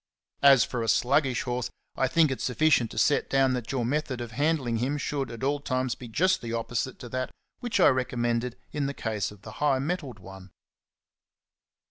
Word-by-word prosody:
As 140 -3 +7
for 125 - -3
a 115 - -2
sluggish 130 +3 +2
horse, 125 -1 -2 0.3
I 130 - +1
think 155 +2 +3
it 130 - -3
sufficient 130 -3 +2
to - - -10
set 145 - +2
down 135 -1 +3
that 125 -2 -3
your 130 -3 -1
method 135 -1 -1
of 120 -1 -6
handling 140 -3 0
him 130 +6 -1
should 140 -3 -2
at 115 +1 -8
all 145 +2 +1
times 130 -3 -1
be 125 - -10
just 175 +12 +2
the 115 -1 -5
opposite 115 +2 -2
to 120 - -8
that 130 +1 -2 0.3
which 240 -4 -1
I - - +7
recommended 120 -1 -1
in 145 -2 -1
the 140 - -4
case 110 -3 -2
of 105 -1 -15
the - - -9
high 145 -3 +3
mettled 140 -4 -3
one. 95 -1 -12
130 Hz, 195 wpm, -27 LUFS, 120-140 Hz, 0.3 s, As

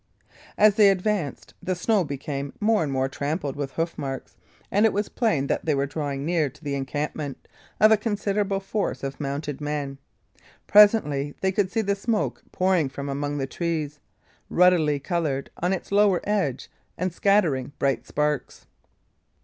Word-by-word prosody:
As 215 0 +6
they 210 -2 +7
advanced, 195 -5 -1
the 185 - -1
snow 195 +3 +2
became 140 -1 -5
more 215 0 +3
and 150 -3 -1
more 130 0 +1
trampled 145 +1 -3
with 140 -2 -4
hoof 165 +1 -2
marks, 135 -2 -5 0.4
and 205 - +3
it - - -1
was 205 +1 -1
plain 215 - +1
that - - -1
they 155 -3 +2
were 140 0 +1
drawing 140 -1 -3
near 165 -3 +1
to 160 - -20
the 145 -1 -3
encampment 140 +1 -4 0.3
of 215 +1 +7
a 220 - +6
considerable 205 -2 -1
force 195 -3 -3
of 135 0 -4
mounted 145 0 -4
men. 145 -2 -3 0.7
Presently 150 -10 +5
they 190 - +2
could 190 -1 0
see 225 - +1
the 200 -1 +1
smoke 210 +2 -1
pouring 185 -6 +2
from 140 +1 -6
among 145 +1 -2
the 135 - -1
trees, 155 -1 -3 0.5
ruddily 170 -5 +4
coloured 145 -3 -2
on 180 +2 0
its 190 - -3
lower 200 -3 +4
edge 190 -11 -1 0.3
and 180 0 -2
scattering 170 -10 +2
bright 135 -1 0
sparks. 150 -1 -2
155 Hz, 165 wpm, -25 LUFS, 140-200 Hz, 0.7 s, they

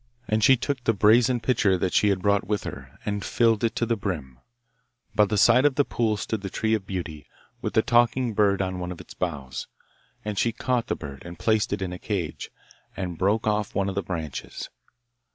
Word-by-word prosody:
And 110 0 +1
she 130 +3 +7
took 135 +1 -3
the 115 - +2
brazen 115 +5 +4
pitcher 105 -5 +2
that 90 +1 -1
she 105 - +4
had 95 -2 0
brought 100 0 +2
with 105 -1 -1
her, - - -8
and 105 -1 -2
filled 115 -2 +2
it 115 - +1
to 120 - 0
the 115 0 +1
brim. 75 - -5 0.7
By 105 - +5
the 105 +1 -1
side 120 +5 +6
of 145 -2 +3
the 145 - +3
pool 110 -3 0
stood 110 +1 -3
the 100 - -4
tree 110 +3 0
of 105 -3 -1
beauty, 85 -6 -5 0.3
with - - -3
the 110 - +5
talking 120 0 +3
bird 100 -2 +3
on 95 -1 -3
one 90 0 -4
of 90 - -8
its - - -11
boughs; 70 -7 -4 0.6
and 105 -2 -2
she 115 - +1
caught 125 0 -1
the - - 0
bird, 70 -3 -8
and 85 0 -9
placed 110 +2 +1
it 100 -1 -1
in 90 -1 -4
a 90 - -7
cage, 95 -7 -3 0.5
and 90 -4 -4
broke 100 +4 +2
off 105 -1 0
one 100 0 +1
of - - -3
the 100 - -1
branches. 80 -7 -5
105 Hz, 220 wpm, -25 LUFS, 90-115 Hz, 0.7 s, she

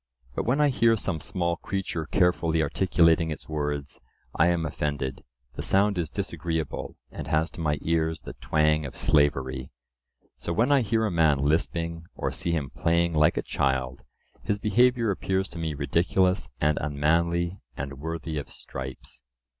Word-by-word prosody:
But - - -2
when 130 +4 +2
I 150 -1 +5
hear 115 -3 +3
some 95 -5 -2
small 85 +2 -1
creature 90 -5 -3
carefully 85 -3 +2
articulating 85 0 +3
its 80 - -6
words, 75 -2 -3 0.3
I 80 - +4
am 85 -2 +1
offended; 70 -4 -3 0.3
the - - -5
sound 100 -1 +2
is 80 -4 -1
disagreeable, 80 -2 -3
and - - -7
has 80 +2 +1
to 85 - -8
my 75 -2 +1
ears 80 -1 0
the - - -8
twang 75 +4 +2
of - - -10
slavery. 65 -3 +1 0.7
So 85 - -3
when 115 +9 +2
I 140 -2 +5
hear 110 0 +1
a 105 - 0
man 80 -4 +4
lisping, 85 +3 -1
or - - -2
see - - -3
him 75 -6 -1
playing 85 0 +1
like 75 -1 +3
a - - 0
child, 65 -1 -1 0.4
his 105 - -1
behaviour 115 +2 +3
appears 95 0 -1
to 85 - -7
me 80 -2 -2
ridiculous 90 +7 +1
and 75 +1 +2
unmanly 85 +4 +1 0.2
and 70 -1 -5
worthy 80 0 -4
of 70 - -8
stripes. 65 0 -8
80 Hz, 160 wpm, -27 LUFS, 75-90 Hz, 0.7 s, I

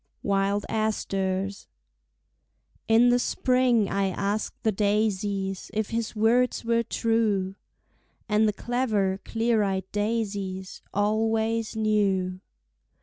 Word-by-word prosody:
Wild 200 0 +1
Asters 195 -3 -2 1.2
In 230 +2 +5
the 245 0 +4
spring 250 -4 +2
I 195 0 0
asked 200 +3 -3
the 220 - +3
daisies 200 -2 -1
If 215 -1 -1
his 230 0 -2
words 235 +3 +2
were 230 0 +2
true, 220 -4 0 0.7
And 215 0 +3
the - - +2
clever, 210 -5 0
clear 225 -1 +1
eyed 190 -2 -1
daisies 205 -3 -3
Always 220 +2 0
knew. 200 -4 +1
210 Hz, 100 wpm, -26 LUFS, 195-225 Hz, 1.2 s, In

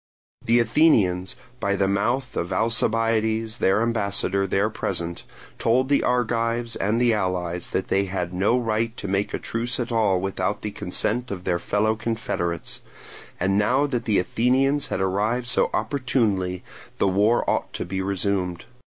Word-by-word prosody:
The 120 +1 +3
Athenians, 110 - +3 0.2
by 100 -3 0
the 100 -1 +1
mouth 120 +7 0
of 85 +2 -2
Alcibiades 115 +1 +1
their 100 +4 +3
ambassador 100 -4 0
there 100 +3 +1
present, 85 -5 -3 0.3
told 130 +3 +2
the 145 - +3
Argives 115 -1 0
and 105 +4 0
the 120 -1 +3
allies 90 -4 -2
that 95 - -2
they 100 +1 +2
had 90 -2 -3
no 100 +7 +2
right 115 -1 -1
to 100 - -5
make 100 +1 0
a - - -2
truce 120 +2 -2
at 120 -1 -3
all 105 -5 +2
without 95 +1 -2
the 105 - -3
consent 115 +6 -2
of 95 -3 -5
their 90 -2 0
fellow 110 +4 +1
confederates, 110 -7 -3 0.6
and 95 +2 +2
now 125 +7 +2
that 125 -4 -2
the 110 -4 +2
Athenians 135 +8 +1
had - - -2
arrived 105 +6 0
so 120 - +2
opportunely 110 -7 0 0.3
the - - +2
war 105 +5 +2
ought - - 0
to - - -4
be 95 0 -3
resumed. 95 -2 -1
105 Hz, 160 wpm, -24 LUFS, 95-115 Hz, 0.6 s, The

